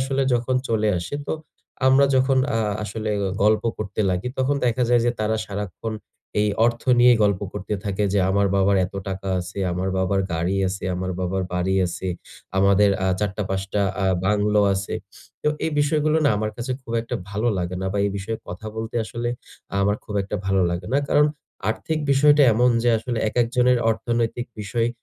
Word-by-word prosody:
আসলে 135 +1 0
যখন 120 +2 0
চলে 110 -1 +1
আসে, 85 +11 -5
তো - - -1 0.5
আমরা 135 +1 +6
যখন 130 0 +3 0.2
আ - - +1 0.2
আসলে 110 +1 -4
গ - - 0 0.2
গল্প 105 +1 +4 0.2
করতে 105 -1 -4
লাগি, 90 +7 -1
তখন 135 +2 +1
দেখা 120 +1 +1
যায় 120 -1 +4
যে, - - +4
তারা 110 +1 +1
সারাক্ষণ 105 +2 -5 0.5
এই 105 - +2 0.2
অর্থ 120 0 -1 0.2
নিয়েই 120 -1 +6
গল্প 100 -2 +2
করতে 105 +3 -4
থাকে 100 +1 -1
যে, 100 - +2
"আমার 100 +1 +2
বাবার 100 +1 +3
এত 90 - -15
টাকা 95 0 -4
আছে, 90 +3 -8
আমার 90 +2 -2
বাবার 95 +1 +1
গাড়ি 85 +4 0
আছে, 95 +1 -5
আমার 95 +1 -3
বাবার 95 +1 -1
বাড়ি 90 +2 0
আছে, 90 +2 -4 0.5
আমাদের 100 +1 +5
আ - - +2
৪ 105 -2 +1
টা, 105 - -1
৫ 95 0 -1
টা 105 - +2 0.2
আ - - +2 0.2
বাংলো 105 +1 +2
আছে। 95 +1 -3 0.5
তো - - +2 0.2
এই 160 - 0
বিষয়গুলো 150 +1 +2
না - - +5
আমার 110 +1 -1
কাছে 120 +2 -3
খুব 115 - -8
একটা 120 - -5 0.2
ভালো 105 +4 0
লাগে 90 0 -3
না। 95 - -2
বা, 100 - -1
এই - - -1
বিষয়ে 110 +3 -3
কথা 90 +5 -7
বলতে 110 0 -5
আসলে 120 +2 -4 0.5
আমার 100 +1 +2
খুব 105 - -7
একটা 100 +2 -4
ভালো 95 -1 +2
লাগে 85 +1 -4
না। 140 - +4
কারণ 150 0 +5 0.4
আর্থিক 155 +8 -2
বিষয়টা 145 +2 +5
এমন 125 +3 +4
যে, 120 - +2
আসলে 120 0 -3
একেকজনের 125 +2 +2
অর্থনৈতিক 120 +1 -1
বিষয় 115 +3 0
105 Hz, 190 wpm, -23 LUFS, 95-120 Hz, 0.5 s, আমরা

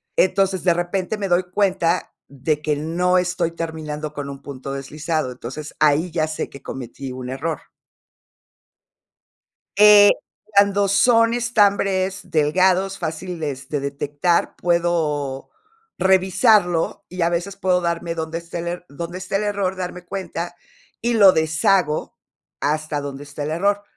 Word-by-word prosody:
Entonces, 190 0 +2
de 175 -2 +4
repente 180 +4 -2
me 200 - -2
doy 180 0 +2
cuenta 185 -3 +1
de 145 +3 -2
que 150 -1 0
no 175 +4 +1
estoy 180 -2 0
terminando 155 -2 -5
con 145 -1 -5
un 140 -1 -8
punto 135 -1 -7
deslizado, 145 0 -3
entonces 135 +5 -8
ahí 155 +3 +3
ya 160 -2 0
sé 155 - -4
que 140 - -13
cometí 130 +1 -7
un 125 0 -6
error. 145 +4 -3 2.2
Eh, 205 0 +9 0.5
cuando 200 0 +4
son 230 +3 +4
estambres 200 -5 +1
delgados, 185 +5 +2
fáciles 160 -5 -5
de 150 - -1
detectar, 145 +5 -1
puedo 160 -6 0 0.5
revisarlo 190 -1 +3
y 180 0 -5
a 170 - +3
veces 175 +3 -2
puedo 185 -2 +1
darme 170 0 -2
donde 160 0 -3
esté 170 0 -7
el 170 - -4
er 175 +1 -5
donde 170 +5 -6
esté 185 +1 -4
el 205 - +1
error, 200 -2 -1
darme 180 -1 -6
cuenta, 175 -2 -5 0.5
y 235 +1 0
lo 200 -4 +7
deshago 160 0 +1 0.5
hasta 150 0 -1
donde 140 0 -6
está 145 0 -7
el 150 - -3
error. 200 +5 +1
170 Hz, 140 wpm, -21 LUFS, 150-190 Hz, 2.2 s, Eh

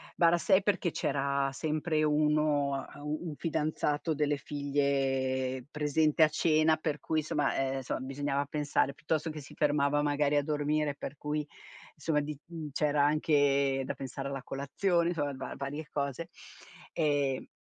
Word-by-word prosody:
barra 170 0 +5
6 190 +1 +4
perché 195 -3 +1
c'era 140 -1 0
sempre 155 +1 0
uno, 150 -2 +2
ehm, 145 - -11
u 150 +1 -2
un 150 - -6
fidanzato 155 -1 -1
delle 145 -1 +1
figlie 135 -3 0
presente 150 +1 +2
a - - +7
cena 155 0 +3
per 150 -2 -2
cui 160 -1 0
somma, 145 -1 0
ehm, 135 0 0
insomma 130 - -3
bisognava 140 +1 -1
pensare, 145 -1 0
piuttosto 160 0 -2
che 155 - -6
si 135 - -13
fermava 145 -1 +2
magari 145 0 +1
a 145 - +2
dormire 150 0 0
e 140 - -10
per 145 - -6
cui 150 0 -2 0.5
insomma 150 0 0
di 150 -1 -5
mhmm, 165 -3 -7
c'era 150 -1 +2
anche 140 -3 +2
da - - -3
pensare 135 +1 -6
alla 135 -1 -4
colazione, 170 +6 0
insomma 145 -4 -1
va 130 - -6
varie 145 +3 -5
cose, 140 +4 -3 0.6
ehm 145 -4 0
145 Hz, 155 wpm, -31 LUFS, 140-155 Hz, 0.6 s, a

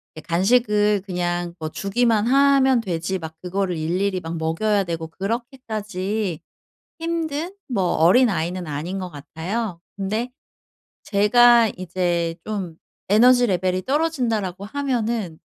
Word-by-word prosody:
애 - - -8
간식을 210 +4 +2
그냥 175 -2 -2
뭐 155 -1 -4
주기만 215 +4 +1
하면 270 -1 +4
되지 180 0 -2
막 160 -1 -8
그거를 185 -1 -2
일일이 185 +4 -1
막 165 -1 -6
먹여야 195 +6 0
되고 165 -2 -4
그렇게까지 210 - -3 0.6
힘든 330 +2 -3
뭐 215 -7 0
어린아이는 180 -2 +3
아닌 165 +7 -4
것 185 -1 -5
같아요. 170 +6 -5 0.2
근데 215 +5 -2 0.7
제가 235 +3 +5
이제 175 -2 -1
좀 195 -6 -4 0.3
'에너지 245 +4 +6
레벨이 185 -2 0
떨어진다.'라고 240 - -1
하면은 230 - -2
200 Hz, 260 characters per minute, -22 LUFS, 175-235 Hz, 0.7 s, 에너지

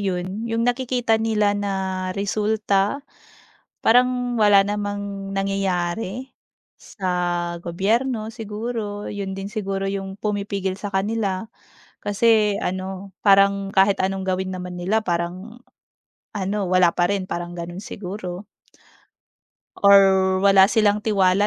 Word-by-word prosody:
'yon, 190 +3 -3
'yong 230 +1 0
nakikita 245 -2 +1
nila 215 -2 +2
na 205 0 -2 0.5
resulta? 210 +4 0 0.7
Parang 250 +1 +3
wala 205 -3 +5
namang 205 -1 -4
nangyayari 195 +4 -2 0.4
sa 195 - -8 0.6
gobyerno, 215 +7 0
siguro 215 -1 -5
'yon 195 -1 -5
din 195 - -5
siguro 195 -2 -3
'yong 195 0 -4
pumipigil 200 -2 -2
sa 205 +1 -6
kanila 200 0 -1 0.5
kasi 210 0 +3
ano, 190 +1 -4
parang 200 -1 +4
kahit 195 +1 +4
anong 190 0 -1
gawin 185 0 -2
naman 180 -1 -6
nila 210 +5 0
parang 180 +6 -3 0.7
ano, 200 0 -2
wala 185 -1 +4
pa 175 +1 +1
rin, 190 -2 -3
parang 175 0 -4
gano'n 175 0 -7
siguro. 185 -1 -7 1.3
Or 200 0 +8 0.4
wala 195 -1 +7
silang 210 -1 +2
tiwala 200 -2 +2
200 Hz, 110 wpm, -22 LUFS, 190-215 Hz, 1.3 s, Or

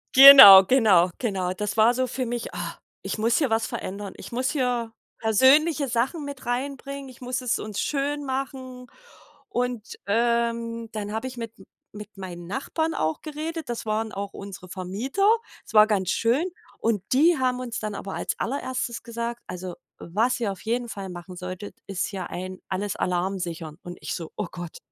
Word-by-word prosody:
Genau, 265 -8 +12
genau, 190 -7 +4
genau. 190 -6 -1
Das 210 +3 -4
war 225 +3 +5
so 255 +1 0
für 255 +1 -3
mich: 240 0 -3
„Oh, - - -7 0.5
ich - - -3
muss 230 +2 +2
hier 285 -6 +1
was 225 0 +1
verändern. 200 +1 -6
Ich - - -10
muss 255 +2 -1
hier 245 -5 -1 0.3
persönliche 270 +7 +4
Sachen 260 +6 -1
mit 280 -3 -8
reinbringen. 275 +2 -4
Ich 255 - -15
muss 250 +1 -3
es 250 - 0
uns 210 -2 -5
schön 290 0 -1
machen“ 260 -1 -5 0.6
und, 245 -3 -3
ähm, 230 0 0
dann 210 -1 -5
habe 225 +4 -3
ich 250 -1 -9
mit 230 -1 -6 0.4
mit 210 0 -11
meinen 175 -2 -8
Nachbarn 315 - -2
auch 155 0 -1
geredet. 310 -1 -5
Das 235 -1 -4
waren 215 0 -1
auch 200 0 -5
unsere 195 -2 -9
Vermieter. 210 - -1 0.4
Es - - -13
war 215 0 +8
ganz 195 -4 0
schön, 245 +9 +1 0.3
und 215 -4 0
die 320 +4 +5
haben 255 -1 0
uns 240 -2 -4
dann 215 -1 -4
aber 195 0 -6
als - - -2
Allererstes 255 -2 -3
gesagt: 235 +1 -5
„Also 180 -1 -6 0.2
was 225 +9 0
ihr 215 -4 -1
auf 195 - -9
jeden 235 +1 -2
Fall 195 -3 -6
machen 180 +1 -9
solltet, 185 +2 -7
ist 195 +1 -2
ja 190 -2 -4
ein 185 +1 -6
alles 195 +1 -3
Alarm 185 +2 -1
sichern.“ 165 -2 -6
Und 175 0 -8
ich - - -4
so: 165 -3 -7
„Oh 210 -4 -2
Gott, 175 -2 -8
230 Hz, 180 wpm, -25 LUFS, 195-255 Hz, 0.6 s, Genau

